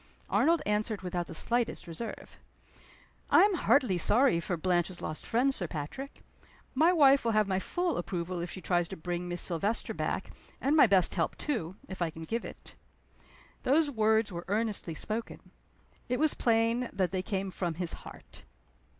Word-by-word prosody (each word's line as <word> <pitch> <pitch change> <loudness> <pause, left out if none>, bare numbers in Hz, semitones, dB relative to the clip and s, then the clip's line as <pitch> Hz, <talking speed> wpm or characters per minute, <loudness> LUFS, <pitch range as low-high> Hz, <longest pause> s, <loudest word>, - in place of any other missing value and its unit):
Arnold 335 0 +3
answered 210 0 -1
without 175 -1 -3
the - - -6
slightest 235 +7 0
reserve 170 +7 -7 0.9
"I - - +7
am 410 0 +4
heartily 255 - +2
sorry 235 0 +4
for 175 +1 -3
Blanche's 175 +1 0
lost 155 - -6
friend, 255 +4 +2
Sir 180 -9 -2
Patrick. 155 - -7 0.5
My 315 +6 +4
wife 280 -5 +5
will 230 -1 +1
have 215 -1 +3
my 190 -1 0
full 350 - -1
approval 175 0 -3
if 175 - -4
she 185 - -6
tries 175 -2 +1
to - - -8
bring 175 +2 -4
Miss 175 0 0
Silvester 200 +6 -1
back - - -3 0.3
and 280 +3 +1
my 295 - +7
best 190 -4 +4
help 165 -3 -1
too, 190 - -3
if 190 -1 -8
I 170 - +1
can 160 +1 -9
give 225 +8 -3
it." - - -11 0.9
Those 290 +2 +3
words 220 -2 +2
were 170 -1 -5
earnestly 205 -5 -2
spoken. 220 +7 -6 0.6
It 250 - +1
was 310 +1 +2
plain 230 +1 +1
that 185 -3 -1
they 190 -1 -1
came 195 0 -3
from 175 -3 -3
his 175 0 -1
heart. - - -12
200 Hz, 175 wpm, -30 LUFS, 175-245 Hz, 0.9 s, I